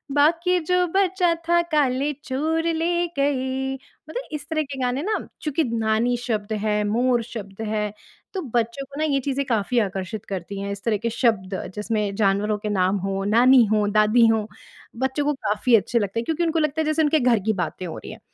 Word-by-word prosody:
बाकी 335 Hz, +5 st, +3 dB
जो 360 Hz, 0 st, +3 dB
बचा 370 Hz, -1 st, +2 dB
था 345 Hz, 0 st, +4 dB
काले 280 Hz, -1 st, +2 dB
चोर 310 Hz, +4 st, -1 dB
ले 345 Hz, +2 st, 0 dB
गए। 265 Hz, -1 st, 0 dB
मतलब 470 Hz, -, -9 dB
इस 295 Hz, -1 st, -5 dB
तरह 315 Hz, -1 st, 0 dB
के 275 Hz, -2 st, -7 dB
गाने 250 Hz, +2 st, 0 dB
ना, 425 Hz, +2 st, 0 dB, 0.2 s
चूँकि 305 Hz, +1 st, 0 dB
नानी 225 Hz, +2 st, +1 dB
शब्द 220 Hz, -3 st, -3 dB
है, 210 Hz, -1 st, +1 dB
मोर 240 Hz, +2 st, +2 dB
शब्द 215 Hz, -3 st, -8 dB
है, 210 Hz, -1 st, -1 dB, 0.4 s
तो 380 Hz, -, -2 dB
बच्चों 235 Hz, +4 st, 0 dB
को 280 Hz, +2 st, -10 dB
ना 310 Hz, -, +1 dB
ये 275 Hz, -, +3 dB
चीज़ें 275 Hz, +1 st, -2 dB
काफ़ी 235 Hz, -1 st, +1 dB
आकर्षित 195 Hz, 0 st, -3 dB
करती 195 Hz, +1 st, -5 dB
हैं, 200 Hz, 0 st, -3 dB
इस 200 Hz, 0 st, -7 dB
तरह 225 Hz, -3 st, +1 dB
के 230 Hz, -, +1 dB
शब्द 220 Hz, -5 st, 0 dB, 0.2 s
जिसमें 210 Hz, -1 st, -1 dB
जानवरों 205 Hz, +1 st, +1 dB
के 210 Hz, +1 st, -4 dB
नाम 190 Hz, -1 st, +2 dB
हो, 195 Hz, 0 st, -2 dB
नानी 245 Hz, +4 st, +6 dB
हो, 210 Hz, -1 st, +2 dB
दादी 215 Hz, +3 st, +4 dB
हो, 220 Hz, -1 st, +1 dB, 0.5 s
बच्चों 265 Hz, +3 st, -1 dB
को 295 Hz, -, +2 dB
काफ़ी 220 Hz, -1 st, +2 dB
अच्छे 230 Hz, +2 st, +2 dB
लगते 205 Hz, +2 st, -2 dB
हैं। 230 Hz, -, -3 dB
क्योंकि 320 Hz, +4 st, 0 dB
उनको 325 Hz, -1 st, +1 dB
लगता 305 Hz, 0 st, 0 dB
है -, -, -1 dB
जैसे 310 Hz, +1 st, +1 dB
उनके 305 Hz, +1 st, +3 dB
घर 245 Hz, -4 st, +3 dB
की 220 Hz, -, +2 dB
बातें 180 Hz, -1 st, -3 dB
हो 165 Hz, -, -6 dB
रही -, -, -9 dB
हैं, -, -, -10 dB
245 Hz, 205 wpm, -23 LUFS, 210-295 Hz, 0.5 s, नानी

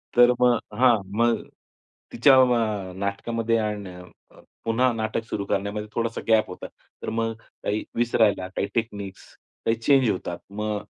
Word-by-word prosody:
तर 120 Hz, 0 st, +7 dB
मग 125 Hz, -1 st, +5 dB, 0.2 s
हां, 125 Hz, -2 st, +6 dB, 0.2 s
मग 115 Hz, 0 st, +3 dB, 0.7 s
तिच्या 135 Hz, +3 st, +6 dB
अ, 110 Hz, -7 st, +2 dB
नाटकामध्ये 115 Hz, +4 st, -1 dB
आणि 105 Hz, -4 st, -3 dB, 0.4 s
अ, -, -, -18 dB, 0.3 s
पुन्हा 120 Hz, +3 st, +2 dB
नाटक 110 Hz, 0 st, -2 dB
सुरू 100 Hz, -, -2 dB
करण्यामध्ये 100 Hz, +2 st, -2 dB
थोडासा 115 Hz, 0 st, -1 dB
गॅप 110 Hz, -1 st, +4 dB
होता. 90 Hz, -, -7 dB, 0.4 s
तर -, -, -2 dB
मग 115 Hz, 0 st, -1 dB, 0.3 s
काही 105 Hz, +1 st, -1 dB
विसरायला, 110 Hz, -5 st, +2 dB
काही 95 Hz, +1 st, -3 dB
टेक्निक्स, 100 Hz, -4 st, -4 dB, 0.4 s
काही 115 Hz, -, +3 dB
चेंज 130 Hz, +1 st, +3 dB
होतात. 90 Hz, -3 st, -3 dB
मग 105 Hz, 0 st, -3 dB
110 Hz, 140 wpm, -25 LUFS, 100-115 Hz, 0.7 s, तर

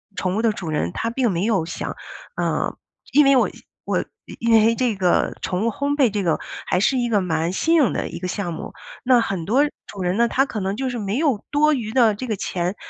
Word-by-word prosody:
宠 185 Hz, +1 st, -1 dB
物 -, -, +1 dB
的 225 Hz, -2 st, +2 dB
主 175 Hz, -5 st, -6 dB
人 150 Hz, -, -1 dB
他 230 Hz, -, -2 dB
并 240 Hz, 0 st, 0 dB
没 175 Hz, 0 st, -1 dB
有 200 Hz, -7 st, +1 dB
想 -, -, -5 dB, 0.4 s
呃， -, -, -1 dB, 0.3 s
因 295 Hz, 0 st, +5 dB
为 275 Hz, 0 st, +6 dB
我 255 Hz, -, +3 dB, 0.3 s
我 -, -, -1 dB, 0.3 s
因 230 Hz, 0 st, +2 dB
为 225 Hz, +1 st, +5 dB
这 240 Hz, -3 st, 0 dB
个 185 Hz, -2 st, +1 dB
宠 185 Hz, +4 st, -1 dB
物 -, -, +3 dB
烘 280 Hz, +5 st, -1 dB
焙 265 Hz, -5 st, +4 dB
这 205 Hz, -1 st, -2 dB
个 165 Hz, -3 st, +1 dB, 0.3 s
还 180 Hz, -, +1 dB
是 260 Hz, +7 st, +2 dB
一 240 Hz, -1 st, 0 dB
个 210 Hz, -3 st, +3 dB
蛮 165 Hz, -2 st, -1 dB
新 325 Hz, -, +1 dB
颖 295 Hz, -7 st, +4 dB
的 -, -, -2 dB
一 -, -, -7 dB
个 180 Hz, -, -4 dB
项 180 Hz, -2 st, -3 dB
目。 -, -, -7 dB, 0.3 s
那 250 Hz, -1 st, +5 dB
很 195 Hz, -6 st, -2 dB
多 250 Hz, -, +3 dB, 0.2 s
主 200 Hz, -, -8 dB
人 180 Hz, 0 st, 0 dB
呢， 235 Hz, 0 st, +4 dB
他 270 Hz, -, +2 dB
可 225 Hz, -, -5 dB
能 190 Hz, +1 st, -1 dB
就 265 Hz, 0 st, -1 dB
是 245 Hz, -, -4 dB
没 205 Hz, +2 st, -2 dB
有 275 Hz, -8 st, +1 dB
多 305 Hz, +1 st, +4 dB
余 230 Hz, -6 st, -3 dB
的 230 Hz, -4 st, +4 dB
这 255 Hz, -, -5 dB
个 220 Hz, -, -1 dB
钱， 180 Hz, +1 st, -2 dB
220 Hz, 260 characters per minute, -22 LUFS, 185-255 Hz, 0.4 s, 为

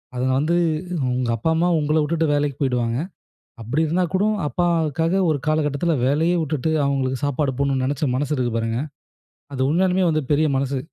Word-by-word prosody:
அதுங்க 130 Hz, +1 st, 0 dB
வந்து 160 Hz, +4 st, +1 dB, 0.6 s
உங்க 125 Hz, -1 st, -1 dB
அப்பா, 160 Hz, -, -1 dB
அம்மா 175 Hz, +2 st, +2 dB
உங்கள 150 Hz, +1 st, +1 dB
விட்டுட்டு 165 Hz, +2 st, 0 dB
வேலைக்கு 145 Hz, -2 st, -1 dB
போயிடுவாங்க. 120 Hz, -3 st, 0 dB, 0.6 s
அப்படி 140 Hz, +9 st, 0 dB
இருந்தா 180 Hz, +4 st, +1 dB
கூட 190 Hz, +2 st, +2 dB, 0.2 s
அப்பாவுக்காக 165 Hz, +1 st, 0 dB
ஒரு 150 Hz, -, +1 dB
காலகட்டத்துல 155 Hz, +1 st, +1 dB
வேலையே 160 Hz, +5 st, +2 dB
விட்டுட்டு 155 Hz, 0 st, -1 dB
அவங்களுக்கு 130 Hz, -2 st, 0 dB
சாப்பாடு 145 Hz, 0 st, 0 dB
போடணும்னு 135 Hz, -2 st, +1 dB
நினைச்ச 140 Hz, +2 st, -2 dB
மனசு 145 Hz, +3 st, -2 dB
இருக்கு 125 Hz, -2 st, -1 dB
பாருங்க. 115 Hz, +1 st, -1 dB, 0.8 s
அது 130 Hz, -, -5 dB
உண்மையாலுமே 185 Hz, +2 st, +2 dB
வந்து 155 Hz, -1 st, 0 dB
பெரிய 155 Hz, +2 st, +3 dB
மனசு. 135 Hz, 0 st, -1 dB
145 Hz, 160 wpm, -22 LUFS, 130-160 Hz, 0.8 s, பெரிய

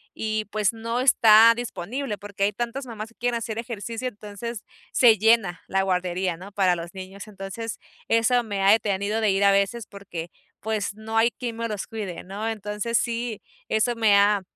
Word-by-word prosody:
y 215 Hz, -1 st, -2 dB
pues 210 Hz, 0 st, +1 dB
no 230 Hz, +2 st, -3 dB
está 230 Hz, -3 st, +7 dB
disponible 235 Hz, +1 st, -4 dB
porque 200 Hz, -1 st, -5 dB
hay 205 Hz, -, +3 dB
tantas 240 Hz, +4 st, -4 dB
mamás 220 Hz, -2 st, -7 dB
que 230 Hz, -, -24 dB
quieren 240 Hz, -1 st, -1 dB
hacer 225 Hz, -1 st, -5 dB
ejercicio. 230 Hz, +1 st, -4 dB
Entonces 210 Hz, 0 st, -7 dB, 0.3 s
se 230 Hz, -4 st, +6 dB
llena 220 Hz, -4 st, +3 dB
la 195 Hz, 0 st, +1 dB
guardería, 180 Hz, -1 st, -1 dB
¿no?, 190 Hz, +3 st, -11 dB
para 190 Hz, -3 st, +2 dB
los 170 Hz, +2 st, -7 dB
niños. 190 Hz, +2 st, -9 dB
Entonces 210 Hz, +3 st, -6 dB, 0.3 s
eso 235 Hz, +2 st, +3 dB
me 200 Hz, -3 st, -3 dB
ha 195 Hz, -, +6 dB
detenido 210 Hz, 0 st, +1 dB
de 215 Hz, -, +3 dB
ir 195 Hz, +1 st, +1 dB
a 200 Hz, -, +6 dB
veces 200 Hz, +3 st, 0 dB
porque 175 Hz, -4 st, -8 dB, 0.3 s
pues 215 Hz, -2 st, -2 dB
no 220 Hz, +1 st, -4 dB
hay 230 Hz, +1 st, +4 dB
quien 235 Hz, -2 st, -6 dB
me 230 Hz, 0 st, -2 dB
los 210 Hz, -3 st, -4 dB
cuide, 205 Hz, -6 st, -6 dB
¿no? 200 Hz, +4 st, -5 dB
Entonces 210 Hz, +2 st, -2 dB
sí, 230 Hz, -2 st, -2 dB, 0.3 s
eso 235 Hz, +2 st, +1 dB
me 220 Hz, -3 st, +4 dB
ha 200 Hz, 0 st, +4 dB
215 Hz, 185 wpm, -25 LUFS, 200-230 Hz, 0.3 s, está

